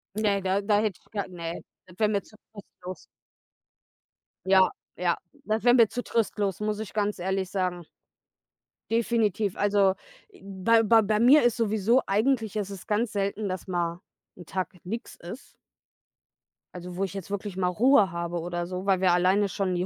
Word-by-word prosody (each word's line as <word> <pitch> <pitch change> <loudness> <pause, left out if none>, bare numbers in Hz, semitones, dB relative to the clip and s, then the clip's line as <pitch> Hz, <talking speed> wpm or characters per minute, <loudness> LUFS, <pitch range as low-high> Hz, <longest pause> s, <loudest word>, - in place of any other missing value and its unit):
Ne, 205 -2 +1
da 190 +1 +1
da 205 0 +2
hätte 210 -4 -1
ich - - -30
gar 205 -2 -3
ne, 170 -2 -6 0.3
das 180 -1 -17
wär 215 - +4
mir 200 -1 0
zu 215 - -20 0.5
trostlos. 180 +1 -8 1.4
Ja, 190 -1 +5 0.3
ja, 175 -1 +1 0.3
das 215 +1 -1
wär 245 0 +6
mir 235 -3 +6
zu 245 +4 -5
trostlos, 205 -4 -1
muss 210 0 -2
ich 220 -2 -6
ganz 210 -1 0
ehrlich 190 +1 -2
sagen. 180 -2 -2 1.1
Definitiv. 220 -4 +1
Also, 200 -2 +3 0.3
äh, 400 - -20
bei 200 +4 +2
bei 225 +1 +5
bei 210 0 +1
mir 260 +6 +6
ist 240 0 +2
sowieso 225 +2 +2
eigentlich 220 +1 +1
ist 205 -2 -2
es 195 -2 -9
ganz 215 +2 0
selten, 200 +1 -2
dass 185 +1 -5
mal 175 -1 -2 0.3
'n 175 - -12
Tag 185 +1 -3
nix 225 +6 -6
ist 185 +10 -11 1.2
also, 180 0 -8
wo 195 - 0
ich 195 -2 -3
jetzt 195 -2 -7
wirklich 200 -1 -4
mal 185 -1 0
Ruhe 210 +1 +4
habe 170 0 -3
oder 175 +1 -3
so, 180 +1 -5
weil 190 -2 +3
wir 185 -1 +3
alleine 185 +3 +3
schon 190 -1 -2
die 175 +1 -1
200 Hz, 180 wpm, -27 LUFS, 185-215 Hz, 1.4 s, wär